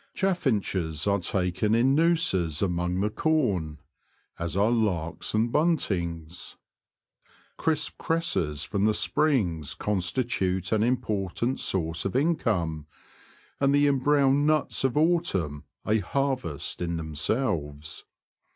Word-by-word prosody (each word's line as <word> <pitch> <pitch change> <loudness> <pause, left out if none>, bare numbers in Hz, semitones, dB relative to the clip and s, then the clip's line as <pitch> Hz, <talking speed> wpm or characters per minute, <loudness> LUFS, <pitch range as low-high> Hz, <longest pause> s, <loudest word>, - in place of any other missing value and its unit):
Chaffinches 105 - 0
are 100 0 +2
taken 95 +4 0
in 125 +4 +3
nooses 140 - +2
among 90 0 0
the 105 +1 0
corn, 105 - 0 0.6
as 85 +2 -3
are 105 +3 +3
larks 100 -7 -1
and 115 +2 +1
buntings. 90 - -1 1.0
Crisp 160 -1 -1
cresses 80 - 0
from 100 +4 -1
the 110 0 +3
springs 95 - +1
constitute 95 -1 -1
an 110 -1 +2
important 115 0 -1
source 80 -3 -1
of 95 - -3
income, 105 - 0 0.7
and 140 0 +3
the 145 0 +4
embrowned 140 +1 +3
nuts 155 -3 +1
of 130 0 +1
autumn 150 - +1 0.2
a 110 +1 +2
harvest 105 - -2
in 85 -1 -1
themselves. 75 - -2
105 Hz, 110 wpm, -27 LUFS, 85-135 Hz, 1.0 s, the